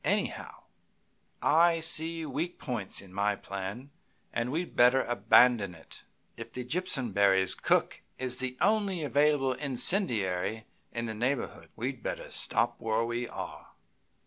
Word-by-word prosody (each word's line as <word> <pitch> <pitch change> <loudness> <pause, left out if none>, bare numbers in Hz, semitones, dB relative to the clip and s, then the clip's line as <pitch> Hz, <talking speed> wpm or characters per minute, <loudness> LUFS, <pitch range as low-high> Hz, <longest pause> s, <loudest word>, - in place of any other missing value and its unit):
Anyhow, - - -2 0.8
I 165 +2 +4
see 165 0 -2
weak 155 +5 -3
points 120 -8 -5
in 95 -2 -15
my 100 +1 +1
plan, 100 +8 -7 0.4
and 120 +1 -1
we'd 170 +4 -3
better 125 +2 +5
abandon 120 -5 +4
it. 80 - -15 0.3
If 115 0 -9
the 125 - -4
Jimpsonberrys' 100 - +2
cook - - +1 0.2
is 125 -1 -3
the 130 0 -3
only 200 -6 +1
available 145 -2 +2
incendiary 115 - +1 0.3
in 115 0 -3
the 110 - -4
neighborhood, 125 +6 -3
we'd - - -4
better - - -5
stop 120 0 +1
where 110 +1 0
we 120 +1 -3
are. - - -8
125 Hz, 130 wpm, -29 LUFS, 110-155 Hz, 0.8 s, better